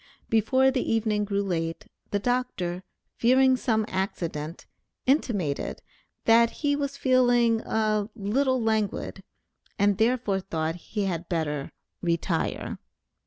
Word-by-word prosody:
Before 260 +4 +3
the 260 -1 0
evening 215 -2 +1
grew 200 0 0
late, 165 -3 -2 0.2
the 205 - 0
Dr., 200 -6 -1 0.4
fearing 260 +2 +5
some 220 -4 +1
accident, 170 -4 -3 0.4
intimated, 210 - 0 0.4
that 230 +1 +6 0.2
he 285 0 +3
was 280 -1 -3
feeling 245 -4 +3
a 215 -2 0
"little 255 +5 +1
languid," 220 -3 -1 0.6
and 205 0 +2
therefore 225 -4 +2
thought 160 -3 -2
that 175 - -12
he 210 -2 -3
had 175 -3 -3
better 150 -5 -2 0.3
"retire." 170 -1 -1
215 Hz, 120 wpm, -26 LUFS, 180-245 Hz, 0.6 s, that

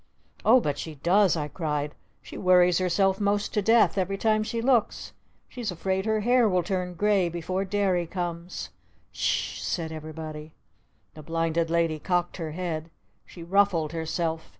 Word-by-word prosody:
"Oh 245 +4 +6
but 145 - -2
she 160 -2 -6
does!" 180 +5 +3
I 150 -1 -2
cried. 150 -3 -3 0.3
"She - - -11
worries 180 -1 +4
herself 190 +2 +1
most 205 0 0
to 210 - +1
death 225 -1 +4
every 195 +1 -1
time 215 +1 +2
she 230 +2 -3
looks! 240 -2 +1 0.3
She's 240 -4 -5
afraid 190 +3 -2
her 220 -1 +1
hair 240 0 +4
will 180 -2 +1
turn 180 0 -3
gray 200 -2 +2
before 180 +3 -3
Derry 190 -3 0
comes!" 175 0 -5 0.4
"S - - -14
s - - 0
h!" - - -7
said 165 -2 -2
everybody. 155 0 -8 0.6
The 155 - -11
Blinded 165 +1 -1
Lady 165 -2 +1
cocked 175 +1 -1
her 160 -4 -5
head. 165 -2 -4 0.4
She 170 - -11
ruffled 175 -4 +2
herself. 165 0 -3
180 Hz, 165 wpm, -26 LUFS, 165-200 Hz, 0.6 s, Oh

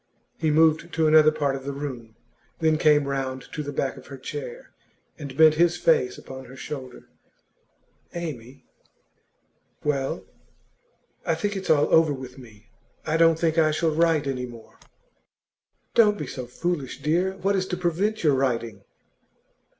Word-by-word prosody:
He 160 - +1
moved 160 +2 +3
to 160 -1 +1
another 155 0 +7
part 140 -3 -1
of 135 - -7
the 140 - -4
room, 125 -6 -7 0.4
then 160 -1 +2
came 150 -2 +4
round 130 -2 -3
to 150 - -3
the 145 -1 -5
back 135 -1 -2
of - - -13
her 135 - -9
chair, 475 - -8 0.5
and 140 -3 -8
bent 160 -1 +7
his 175 0 +3
face 460 -5 +2
upon 130 0 -10
her 125 +2 -12
shoulder. 130 -2 -8 1.0
'Amy 140 -7 -7 0.6
' - - -42
'Well.' 140 -2 -1 1.0
'I - - 0
think 205 -1 -2
it's 190 -1 -5
all 150 -2 +3
over 160 -2 +5
with 130 0 -10
me. 110 -1 -16 0.3
I 155 - 0
don't 165 -1 +5
think 165 0 +1
I 155 -1 +4
shall 155 +1 0
write 160 -2 +2
any 130 -2 -3
more.' 115 -2 -14 1.1
'Don't 210 -3 +5
be - - -4
so 125 -2 -7
foolish, 150 +1 -3
dear. 175 +5 +1
What 200 +1 0
is 185 -1 -1
to 180 - -3
prevent 185 +5 -1
your 150 -3 +4
writing? 115 -6 -1
150 Hz, 160 wpm, -25 LUFS, 130-170 Hz, 1.1 s, another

